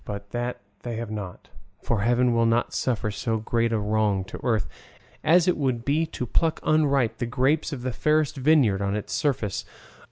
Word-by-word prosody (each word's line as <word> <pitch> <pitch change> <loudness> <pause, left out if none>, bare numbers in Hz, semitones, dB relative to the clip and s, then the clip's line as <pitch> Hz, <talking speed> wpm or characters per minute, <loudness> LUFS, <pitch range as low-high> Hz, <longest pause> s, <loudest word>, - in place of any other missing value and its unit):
But 100 -1 -7
that 120 +1 -3 0.2
they 120 -2 -5
have 115 -1 -5
not, 100 -4 -7 0.3
for 115 -4 0
Heaven 120 +2 +3
will 115 0 +3
not 115 +1 +1
suffer 110 -4 -1
so 115 +2 -2
great 115 +1 0
a 115 - +1
wrong 105 -2 +1
to - - -9
Earth, 110 - +1 0.6
as 170 +3 +4
it 180 - +2
would 130 -5 -1
be 155 +4 +1
to 125 - -5
pluck 160 +6 +1
unripe 140 -6 +2
the 120 - -1
grapes 135 +6 +1
of 130 -4 -5
the 130 -1 -2
fairest 155 +3 +1
vineyard 135 -8 +3
on 100 0 0
its 105 - -4
surface. 135 - -1
120 Hz, 190 wpm, -25 LUFS, 110-140 Hz, 0.6 s, as